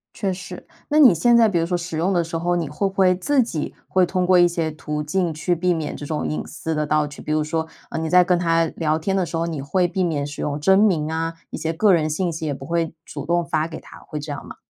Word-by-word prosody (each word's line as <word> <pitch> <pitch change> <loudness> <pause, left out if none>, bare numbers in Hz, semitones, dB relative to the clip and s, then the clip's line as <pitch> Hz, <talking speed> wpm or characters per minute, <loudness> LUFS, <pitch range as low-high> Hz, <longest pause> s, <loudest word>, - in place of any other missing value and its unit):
确 195 -2 -1
实。 185 0 -8 0.2
那 300 - +1
你 270 -9 +8
现 235 +9 +3
在 225 -2 +5
比 175 -4 +1
如 165 - +1
说 175 +1 -1
使 170 -2 -5
用 180 +4 +1
的 175 -2 +2
时 165 0 -4
候， 175 +1 0
你 170 -4 -2
会 195 +7 -1
不 190 - -6
会 185 -1 +4
自 255 +9 +2
己 165 -10 -4
会 185 -1 +3
通 180 +1 -1
过 180 0 +5
一 175 - +6
些 165 -2 -2
途 150 -1 -4
径 170 +2 -1
去 160 +4 -1
避 175 +1 +1
免 155 -3 -3
这 145 - -7
种 150 0 -3
隐 155 - -2
私 160 - -4
的 150 -1 -1
盗 150 0 +2
取。 145 0 -10
比 155 - -3
如 155 - +1
说， 160 +1 -2 0.2
呃， - - -2
你 160 -1 -2
在 180 +1 +6
跟 175 0 +2
它 165 -1 +2
聊 155 -1 +1
天 180 +5 -2
的 185 - +1
时 165 0 -6
候， 165 - 0
你 160 -5 -4
会 175 +6 +1
避 185 +1 -1
免 150 -4 -1
使 145 0 -7
用 145 -1 -2
真 190 +6 +4
名 165 -7 +2
啊， 165 +1 -2 0.2
一 - - -6
些 160 0 -2
个 200 +4 +4
人 155 -2 +2
信 175 +3 -1
息 160 0 -5
也 150 - -1
不 135 - -8
会 165 0 -1
主 145 -2 -7
动 175 +1 +1
发 160 -1 0
给 160 - -7
它， - - -14
会 155 - -5
这 150 0 -5
样 145 - -7
吗？ - - -9
165 Hz, 315 characters per minute, -22 LUFS, 155-180 Hz, 0.2 s, 你